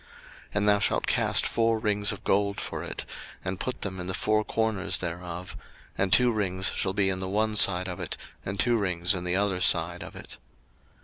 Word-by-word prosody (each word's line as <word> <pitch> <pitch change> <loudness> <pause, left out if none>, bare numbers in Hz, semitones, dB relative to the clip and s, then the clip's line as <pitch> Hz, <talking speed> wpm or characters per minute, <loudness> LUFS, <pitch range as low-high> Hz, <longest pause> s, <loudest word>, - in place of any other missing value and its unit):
02:025:012 - - -24 0.5
And 105 0 +1
thou 100 0 +4
shalt - - 0
cast - - +2
four 115 -1 +1
rings 105 -2 +1
of 105 - -8
gold 100 0 +1
for - - -5
it, - - -6 0.4
and 95 0 -2
put 130 - -3
them 95 -2 -3
in 90 - -5
the 95 - -2
four 110 +1 +1
corners 105 -3 0
thereof; 90 +1 -6 0.4
and 95 -1 0
two 125 +4 +6
rings 95 -4 0
shall 95 - -1
be 100 -1 +2
in 95 - -2
the 95 0 -3
one 110 +2 +1
side 90 -3 +5
of 90 -1 -6
it, - - -3 0.3
and 95 0 -5
two 120 +5 +4
rings 90 -3 +1
in 90 -2 -3
the 90 0 +1
other 95 -2 0
side 85 -1 +2
of - - -9
it. - - -9
95 Hz, 210 wpm, -27 LUFS, 90-105 Hz, 0.5 s, two